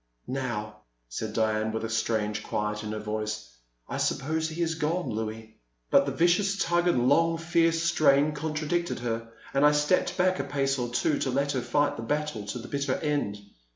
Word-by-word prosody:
Now/' 120 -5 -3 0.3
said 105 - -4
Diane, 110 -1 +1
with 110 +1 -3
a - - -4
strange 110 -2 0
quiet 105 0 -2
in 105 - -4
her 110 - -3
voice, 110 -2 -4 0.3
I - - -4
suppose 160 +3 0
he 165 +2 -2
is 165 -1 0
gone, 165 +1 -1
I<ouis.*' 110 0 -4 0.4
But - - +5
the - - 0
vicious 195 +4 +2
tug 175 -2 +2
and 125 -8 +3
long, 165 +4 +4
fierce 165 0 +2
strain 155 -3 +4
con 155 +1 -4
tradicted 160 -1 -1
her, 115 -1 -3 0.2
and 140 +1 +3
I 150 0 +6
stepped 160 +4 +2
back 185 -1 +2
a - - 0
pace 135 -1 0
or 120 - -1
twG 140 +5 0
to 135 - 0
let 140 +2 +1
her 130 - -1
fight 145 +4 +1
the - - -4
battle 145 -4 -2
to 100 - -3
the 120 0 -8
bitter 140 -2 -1
end. 145 -9 -1
140 Hz, 195 wpm, -28 LUFS, 110-160 Hz, 0.4 s, I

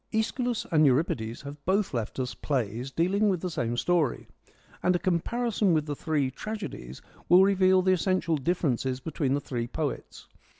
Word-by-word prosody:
iEschylus 235 +2 -1
and 155 -2 +4
Euripides 125 -5 +1
have 140 +1 -9
both 195 0 +1
left 115 -3 -3
us 125 -1 -2
plays 125 -2 -2
dealing 190 +8 +1
with 185 -3 0
the 180 +1 -4
same 120 -5 -2
story, 165 -3 0 0.5
and 180 0 +2
a - - +4
comparison 205 +3 0
with 155 -1 +1
the 145 -1 -3
three 145 -3 -1
tragedies 195 - -7 0.3
will 180 +2 +8
reveal 190 -1 +4
the 185 0 +4
essential 185 -2 +1
differences 135 -4 -1
between 140 -2 -1
the - - 0
three 120 -4 -4
poets. 145 +2 -5
160 Hz, 165 wpm, -27 LUFS, 130-185 Hz, 0.5 s, will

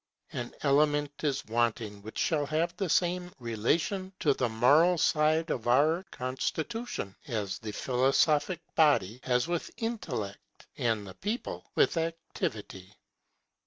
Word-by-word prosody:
An 120 - -4
element 145 0 +2
is 140 -2 0
wanting 115 -2 -1
which 110 +2 -9
shall 150 -3 +1
have 165 +3 0
the 190 -1 -2
same 180 +1 +1
relation 145 - -1
to 145 - +4
the 125 -2 0
moral 145 +11 +5
side 155 +1 +2
of 120 -2 -3
our 150 +8 +4
constitution, 130 - -3
as 105 -6 -2
the 110 -2 -5
philosophic 135 - +2
body 135 - +3
has 125 -1 +1
with 175 -1 -2
Intellect, 170 - -5
and 110 -3 0
the 95 - -9
people 210 - -4
with 415 - +3
Activity. 110 - -4
145 Hz, 125 wpm, -30 LUFS, 115-165 Hz, -, moral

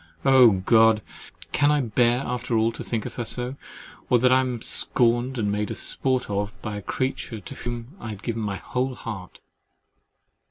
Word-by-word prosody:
Oh 130 -3 +7 0.2
God! 110 -2 +5 0.5
can 145 +1 +3
I 150 - +3
bear 120 +1 +2
after 125 -1 -2
all 110 +1 +2
to 115 - -8
think 115 -3 -3
of - - -6
her 120 - -1
so, 125 +3 -3 0.5
or 125 - +5
that 125 +2 +3
I 130 - +6
am 125 -3 -2
scorned 120 +1 +3
and 105 -3 0
made 105 +1 -1
a - - -4
sport 130 -1 0
of 105 +1 -3
by 105 -1 -4
the - - -6
creature 130 0 -3
to 100 - -9
whom 120 0 -6
I 115 - -7
had 105 -2 -8
given 115 -1 -3
my 100 -2 -2
whole 130 +4 -3
heart? 95 -7 -8
120 Hz, 190 wpm, -24 LUFS, 110-125 Hz, 0.5 s, Oh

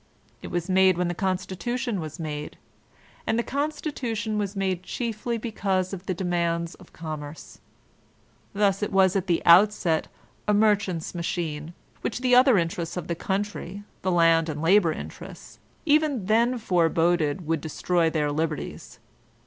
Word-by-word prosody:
It - - -7
was 175 0 -2
made 190 -1 +4
when 180 -1 0
the - - -1
Constitution 190 +5 -2
was 155 +2 -7
made; 150 -2 -5 0.7
and 225 - +1
the 235 - +1
Constitution 270 -8 -2
was 205 0 -3
made 190 -2 -1
chiefly 235 +3 -3
because 195 -5 -1
of 195 0 -7
the 185 - -1
demands 170 -2 -1
of 185 - -17
Commerce. 155 -2 -8 0.9
Thus 200 -1 +1
it 210 - -1
was 190 -1 +4
at 195 0 0
the 170 -2 +1
outset 175 -2 +5 0.4
a 210 - +3
merchant's 205 -5 +1
machine, 165 -2 -3 0.3
which - - -3
the 250 -1 +2
other 250 -2 +7
interests 170 0 -2
of 180 - -3
the - - +1
country, 200 +1 -3 0.2
the 185 - -1
land 165 -1 +4
and 150 -1 -4
labor 170 +1 +4
interests, - - -9 0.3
even 295 - +2
then 235 +4 +3
foreboded 170 -4 +1
would 160 -1 0
destroy 165 +2 0
their 150 -2 0
liberties. 155 0 -4
185 Hz, 150 wpm, -25 LUFS, 165-210 Hz, 0.9 s, other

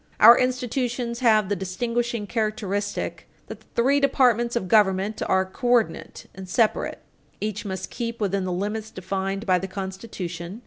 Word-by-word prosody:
Our 230 +3 +10
institutions 250 -1 -1
have 215 -5 +4
the 205 - 0
distinguishing 230 +4 -2
characteristic 205 -2 -2 0.2
that - - -9
the - - -26
three 270 +4 +3
departments 245 -4 +3
of 230 -6 -1
government 200 0 +2
are 190 0 +2
coordinate 240 +4 -1
and 190 -1 -9
separate. 220 +3 0 0.4
Each 210 0 -3
must 190 -2 -5
keep 235 -1 -4
within 200 -2 0
the 185 - -2
limits 210 +4 -3
defined 195 +2 -3
by 185 -2 +3
the 190 - -4
Constitution. 190 -1 -6
210 Hz, 145 wpm, -24 LUFS, 190-235 Hz, 0.4 s, Our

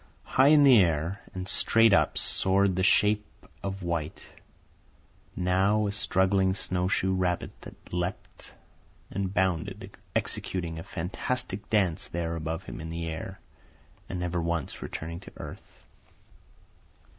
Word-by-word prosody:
High 130 +1 +4
in 150 0 +7
the 130 -6 +8
air, 85 +2 0
and 90 0 -4
straight 115 +2 +4
up, - - +3
soared 95 0 +2
the 95 - 0
shape 105 +2 +3 0.3
of 95 -1 -4
white, 85 -3 -3 1.1
now 95 +4 +2
a 100 - 0
struggling 95 -1 +2
snowshoe 95 0 0
rabbit 90 -2 0
that - - -13
leaped 90 +1 -4 0.6
and 95 -1 -2
bounded, 95 -3 -1 0.2
executing 85 -3 -2
a - - -6
fantastic 100 +5 -3
dance 95 -7 +2
there 85 -1 -3
above 80 +2 -3
him - - -8
in 80 - -6
the 85 +1 -4
air 80 +4 -6 0.7
and 90 - -3
never 90 0 -1
once 85 -2 -2
returning 85 +1 -5
to - - -12
earth. - - -11
95 Hz, 130 wpm, -28 LUFS, 85-100 Hz, 1.1 s, the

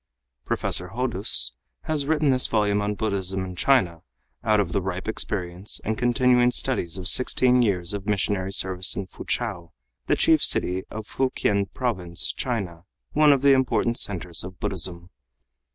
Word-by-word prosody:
Professor - - 0
Hodous 65 0 +2 0.3
has 145 -3 -1
written 155 -2 +1
this 130 -1 +3
volume 105 -2 0
on 105 0 -2
Buddhism 95 -3 -2
in 90 -1 -8
China 90 -7 +1 0.4
out 110 -1 +2
of 95 -4 -1
the 100 - -1
ripe 95 +1 -5
experience 95 -3 -2
and 110 - -1
continuing 125 0 +2
studies 120 -9 -1
of 90 -1 +3
sixteen 125 +1 +4
years 95 -5 0
of 100 0 -6
missionary 100 -2 -1
service 95 -1 +1
in 100 - -4
Foochow, 95 -2 -5 0.3
the - - +2
chief - - +3
city 95 +1 +3
of 110 0 -8
Fukien 100 -6 -1
Province, 90 -9 -2
China, 95 -9 -5 0.3
one 150 0 +4
of 140 -1 +1
the 140 -1 +6
important 120 -3 0
centers 90 -4 -1
of 90 0 -10
Buddhism. 90 -1 -3
100 Hz, 150 wpm, -23 LUFS, 90-125 Hz, 0.4 s, the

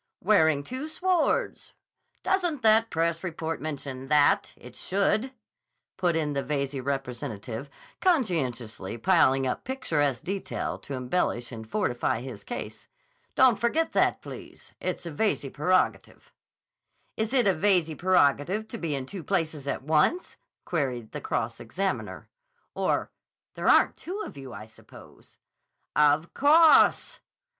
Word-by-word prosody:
"Wearing 160 -7 +4
two 260 - -5
swords. 350 +1 0 0.5
Doesn't 355 -7 0
the 220 +1 +5
press 165 +1 -1
report 165 -2 -4
mention 140 -3 -5
that? 150 0 +3
It - - -13
should," 205 +6 0 0.6
put 175 -3 0
in 150 -2 -1
the 140 - -1
Veyze 140 0 -2
representative 125 -2 -4 0.3
conscientiously 130 - 0
piling 135 -3 +3
up 125 - -2
picturesque 150 - -1
detail 195 +1 -4
to 140 - -7
embellish 125 -2 -1
and 110 -2 -9
fortify 120 - -1
his 125 -5 -8
case. 245 - -7 0.5
"Don't 255 -5 +5
forget 315 +8 +1
that, - - +1
please. - - -11
It's - - -4
a 170 - -5
Veyze 150 -4 -1
prerogative." 180 +6 0 0.8
"Is 220 +1 -2
it 260 -3 +3
a 195 - +4
Veyze 175 -2 +2
prerogative 180 +3 +2
to 230 - -6
be 160 -4 -2
in 135 -1 -4
two 180 +5 -8
places 160 -7 -2
at 140 - -2
once?" 155 - +1 0.3
queried 130 -9 -2
the - - -6
cross - - -2
examiner. 190 +12 -4 0.5
"Or—there - - -4
aren't - - +4
two 375 +5 -6
of - - -10
you, 135 -2 -9
I 110 - -8
suppose." 110 - -17 0.6
"Of 150 +2 +3
_cawse! 310 +3 +5
160 Hz, 130 wpm, -27 LUFS, 135-215 Hz, 0.8 s, the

